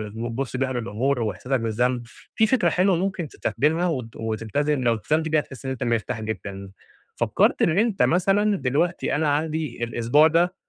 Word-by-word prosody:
وبتبص 120 +3 -4
بيها 130 0 -1
للأمور 120 +2 -1
وإحساسك 125 +4 -1
بالذنب، 120 +2 0 0.3
في 220 - +4
فكرة 215 -8 +3
حلوة 185 +2 +2
ممكن 185 -1 -2
تستخدمها 155 +7 0 0.3
وت 110 -1 -3
تلتزم 145 +5 -1
لو 120 -1 +3
التزمت 155 +9 -1
بيها 155 0 +3
هتحس 135 -2 -9
إن 130 - -2
أنت 130 -1 -4
مرتاح 115 -2 -1
جدًا، 100 -2 -6 0.5
فكّرت - - +2
إن 170 +3 +3
أنت 220 -3 +2
مثلًا 195 +4 +2
دلوقتي 145 +7 0
أنا 150 0 +1
عندي 155 -5 -3
الأسبوع 120 +6 +3
ده 170 +3 +2
135 Hz, 165 wpm, -24 LUFS, 115-165 Hz, 0.5 s, في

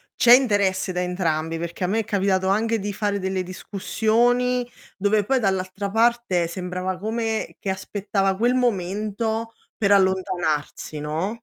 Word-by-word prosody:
c'è 240 -1 +7
interesse 205 -7 +3
da 180 0 -2
entrambi, 165 -3 -1
perché 170 +2 -5
a - - +1
me 215 +5 +1
è - - 0
capitato 195 -3 0
anche 225 +3 +1
di 205 +1 -4
fare 205 0 -1
delle 190 -1 -2
discussioni, 240 +6 0 0.3
dove 205 +1 +2
poi 265 +5 +1
dall'altra 195 -1 -1
parte 225 -5 +2
sembrava 180 +1 -4
come 220 +2 -2
che 195 - -4
aspettava 195 0 -1
quel 240 +5 +2
momento 220 0 -1 0.2
per 200 -2 +1
allontanarsi, 185 -6 0
no? 155 +6 -2
195 Hz, 140 wpm, -23 LUFS, 185-225 Hz, 0.3 s, c'è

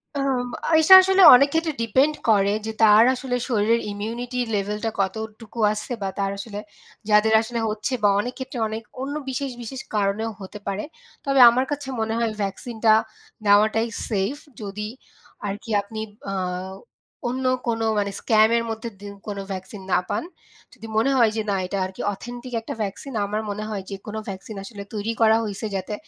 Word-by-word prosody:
আম 270 -3 0 0.3
এটা 320 +4 +7
আসলে 380 +1 +3
অনেক 280 +3 +5
ক্ষেত্রে 325 -1 0
ডিপেন্ড 260 +7 +3 0.2
করে 200 -2 +4
যে, 220 - -2
তার 215 0 +8
আসলে 255 -1 -3
শরীরের 230 -1 +2
ইমিউনিটি 235 +5 -4 0.2
লেভেলটা 210 +2 -2
কতটুকু 220 +3 -4
আছে, 215 +3 -6
বা 195 - -1
তার 195 0 0
আসলে 205 0 -6 0.5
যাদের 210 +1 +4
আসলে 235 +1 -4
হচ্ছে, 215 +5 -3
বা 205 - +6
অনেক 245 +4 -2
ক্ষেত্রে 260 -1 -6
অনেক 220 +1 -5 0.2
অন্য 280 +2 -3
বিশেষ, 265 +1 -3
বিশেষ 260 +3 -6
কারণেও 210 +2 0
হতে 195 +2 -8
পারে। 200 +1 -2 0.4
তবে 275 -1 +2
আমার 250 +3 +1
কাছে 290 -1 -3
মনে 220 0 -1
হয়, 230 -1 0
ভ্যাকসিনটা 220 +3 +1 0.5
নেওয়াটাই 215 +3 +4 0.2
সেইফ, 205 +4 0 0.3
যদি 210 +1 -5 0.6
আরকি 205 +3 -6
আপনি 215 +2 -8 0.3
আ - - -3 1.0
অন্য 260 +2 -3 0.2
কোনো 225 -1 0
মানে 200 -1 -1
স্ক্যামের 225 +1 +3
মধ্যে 225 +1 -4
দি 205 - -9 0.2
কোনো 200 -1 -4
ভ্যাকসিন 190 +2 -7
না - - +4
পান। 210 - -1 0.5
যদি 225 - -11
মনে 230 +5 +3
হয় 230 -3 +5
যে, 220 - 0
না 200 - +1
এটা 190 +2 -3
আরকি 185 0 -7
অথেন্টিক 245 +4 -9
একটা 225 - -6
ভ্যাকসিন, 200 +6 -5
আমার 210 +2 -2
মনে 210 +1 -4
হয় 205 -3 -4
যে 200 - -4
কোনো 215 +1 -4
ভ্যাকসিন 195 +2 -7
আসলে 200 0 -8
তৈরি 215 +1 -2
করা 220 0 +6
হইছে, 205 +1 -5
যাতে 190 +2 -3
220 Hz, 170 wpm, -23 LUFS, 205-245 Hz, 1.0 s, তার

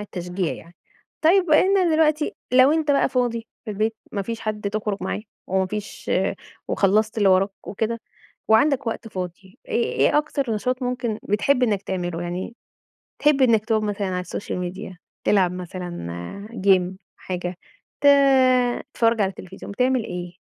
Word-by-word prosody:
التشجيع 180 -3 -3
يعني. 170 +2 -12 0.5
طيّب 355 +3 +4
وأنت 375 +6 +5
دلوقتي 305 -1 +2 0.2
لو 255 +3 +6
أنت 315 -2 +1
بقى 280 - +3
فاضي 240 -3 -1 0.2
في 220 - -5
البيت، 215 +2 -1 0.2
ما 200 - -1
فيش 230 +3 -5
حد 210 -2 -3
تخرج 210 -1 -2
معاه، - - -2 0.3
وما 190 0 +1
فيش 210 +2 -6 0.6
وخلّصت 215 +3 +2
اللي 205 - +4
وراك 190 +1 +4 0.2
وكده، 225 +3 -2 0.5
وعندك 250 +4 +4
وقت 225 0 -3
فاضي، 185 +2 -7
إيه 235 - +1
إيه 295 - +3
أكتر 285 -4 -2
نشاط 250 +5 -2
ممكن 245 -3 -2
بتحب 250 +6 +1
إنّك 205 -5 +1
تعمله، 175 -3 -3
يعني 180 +6 -4 0.7
تحب 295 -2 +3
إنّك 225 -4 +4
تقعد 220 -2 +1
مثلًا 205 -1 -2
على 180 -1 -2
الsocial 180 -2 -4
media، 190 0 -8 0.3
تلعب 190 -4 +3
مثلًا 180 - -6
آآ 200 - -7
game، 190 -1 +3 0.2
حاجة، 180 -1 -5 0.4
ت 285 - +4 0.9
تتفرّج 230 -1 +2
على 195 - +2
التلفزيون، 190 +1 -10
بتعمل 250 +3 +1
إيه، 180 0 -6
210 Hz, 150 wpm, -23 LUFS, 185-245 Hz, 0.9 s, لو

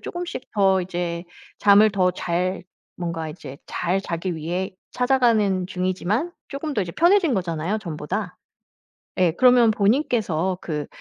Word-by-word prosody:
쪼금씩 350 -6 -6
더 190 -2 +3
이제 175 -1 -4 0.3
잠을 210 +1 +6
더 185 -2 +2
잘 180 +1 -2 0.3
뭔가 170 -2 -4
이제 140 -4 -10
잘 185 +3 -1
자기 175 0 -3
위해 175 +4 -3 0.2
찾아가는 230 -8 +2
중이지만 185 - -1 0.2
쪼금 285 +1 -4
더 205 - +1
이제 170 -2 -6
편해진 345 -2 +4
거잖아요 180 0 -1
전보다. 180 +2 -4 0.8
예. 180 -2 +4
그러면 245 +3 +5
본인께서 200 - +1
그 150 -3 -4
190 Hz, 280 characters per minute, -23 LUFS, 175-220 Hz, 0.8 s, 잠을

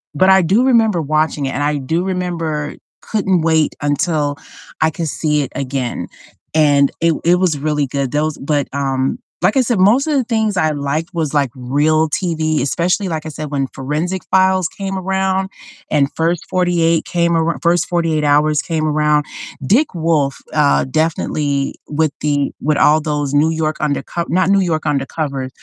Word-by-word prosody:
But 185 +6 +4
I 190 0 +6
do 195 +8 +2
remember 225 -8 +3
watching 155 -1 0
it 135 - -2
and 145 - -2
I 150 0 0
do 160 +6 -1
remember 170 -5 -3 0.3
couldn't 195 -5 0
wait 160 -1 +2
until 145 -1 0 0.4
I 160 - +4
could 160 +1 -4
see 150 0 0
it 140 - -4
again, 130 -2 -3 0.5
and 145 -3 +4
it 165 0 +3
it 175 +1 +5
was 180 -4 +1
really 150 0 -1
good. 135 -1 -2
Those 150 +1 -1
but, 145 -1 -1
um, 135 -1 -1 0.2
like 185 +8 +2
I - - +5
said, 240 -2 0
most 215 +10 +4
of 310 - +1
the 270 -3 +2
things 220 -3 0
I 160 -4 +2
liked 150 +3 -2
was, 160 -4 -2
like, 140 -3 +2
real 150 +5 +1
TV, 155 -2 -1
especially 180 - 0
like 160 -2 -4
I - - -4
said, 155 -1 -7
when 135 -2 -1
Forensic 155 +7 -3
Files 190 -2 +3
came 195 -1 -5
around 190 0 -1 0.4
and 145 -2 +3
First 165 +1 -1
48 170 -3 +1
came 170 -1 0
arou 165 0 0
First 170 +1 +1
48 165 -3 0
Hours 150 +1 +3
came 160 -2 -2
around. 150 -1 +2 0.4
Dick 275 - +2
Wolf, 160 -5 0 0.2
uh, 150 -2 +3
definitely 145 -1 -1
with 155 0 +1
the 145 -2 0
with 150 0 +1
all 155 +2 +4
those 145 -2 -2
New 150 +2 +3
York 160 -1 -2
Underco 150 +3 -2
not 185 +2 +2
New 200 0 +4
York 165 -4 -1
Undercover, 140 -2 -2
155 Hz, 175 wpm, -17 LUFS, 145-175 Hz, 0.5 s, I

